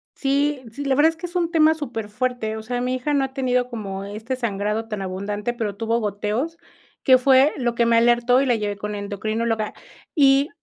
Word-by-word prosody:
Sí, 280 0 0
sí, 285 +5 -6
la 275 - +2
verdad 295 +4 +5
es 325 - -5
que 325 - -7
es 350 +1 -9
un 340 -2 +1
tema 315 -2 +5
superfuerte, 245 -4 -3
o - - -5
sea, 245 +2 -3
mi 250 +1 -1
hija 255 +4 -2
no 280 -1 +2
ha 265 0 -4
tenido 250 -2 0
como 195 -5 -5
este 215 +5 -5
sangrado 215 -2 -2
tan 210 -3 -4
abundante, 205 +4 -3
pero 220 -4 -3
tuvo 225 +2 0
goteos, 215 +9 -2 0.5
que 260 -1 +7
fue 265 +3 +5
lo 240 -3 0
que 235 0 +2
me 230 - +4
alertó 240 +2 +4
y - - +1
la 245 -3 +3
llevé 205 -2 -3
con 210 +1 -5
la 205 - -4
endocrinóloga. 215 +2 -2 0.4
Y, 275 0 +4
240 Hz, 215 wpm, -22 LUFS, 210-270 Hz, 0.5 s, que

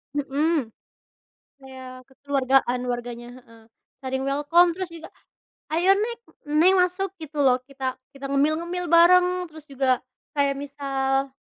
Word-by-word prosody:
Mhm, 290 -1 0 0.9
kayak 260 -1 -11
kekeluargaan 265 -2 0
warganya 240 0 -5
heeh, 230 -3 -17 0.4
saling 265 0 -3
welcome, 295 +6 +3
terus 370 +1 -5
juga, 335 -1 -11 0.6
"Ayo 355 +5 +4
Neg. 455 +3 -2 0.4
Neng 370 +4 +6
masuk 365 +1 +1
gitu 300 0 -8
loh 255 -2 +3
kita 265 -1 -5 0.2
kita 275 0 -8
ngemil-ngemil 320 +5 -1
bareng." 360 +1 +5
Terus 315 -2 -13
juga 270 -1 0 0.4
kayak 280 -1 +1
misal 275 -1 -2
280 Hz, 120 wpm, -24 LUFS, 265-340 Hz, 0.9 s, Neng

